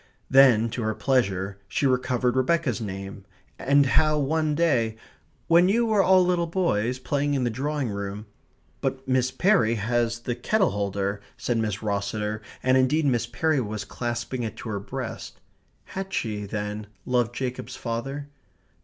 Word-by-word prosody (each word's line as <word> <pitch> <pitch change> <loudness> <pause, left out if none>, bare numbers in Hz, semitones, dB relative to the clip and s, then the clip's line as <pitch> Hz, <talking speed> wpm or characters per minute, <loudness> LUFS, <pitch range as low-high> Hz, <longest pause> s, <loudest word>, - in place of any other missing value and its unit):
Then 130 -5 +6
to 120 - -3
her 110 -1 -1
pleasure 100 -7 0
she - - -1
recovered 125 -1 +1
Rebecca's 130 -2 +1
name; 95 -1 -6 0.4
and 140 +1 +4
how 155 +3 +3
one 150 +1 +1
day 120 -9 +1 0.5
"when 170 +2 +5
you 235 +4 +3
were 215 -3 +3
all 185 -1 +5
little 175 -1 +1
boys, 130 - 0
playing 145 +2 -1
in 130 - 0
the 120 - 0
drawing 140 +3 -2
room 100 +1 -5 0.3
" - - -38
"But 135 0 -3
Miss 130 -1 +2
Perry 175 - +3
has 115 +2 0
the 120 - -2
kettle 190 - +1
holder," 100 0 -2 0.2
said 120 -2 -1
Miss 105 -2 -2
Rosseter, 105 +1 -2 0.2
and 130 0 +4
indeed 145 +4 +2
Miss 120 -4 +1
Perry 145 +4 +1
was 105 -2 -4
clasping 120 +3 -3
it 115 -2 -4
to 115 - -7
her 100 -2 -2
breast. 115 +1 -6 0.4
(Had 195 0 -6
she, 105 - -2
then, 105 +1 -4 0.2
loved 120 -1 +1
Jacob's 130 -1 -4
father?) 135 +5 -4
125 Hz, 160 wpm, -25 LUFS, 110-145 Hz, 0.5 s, Then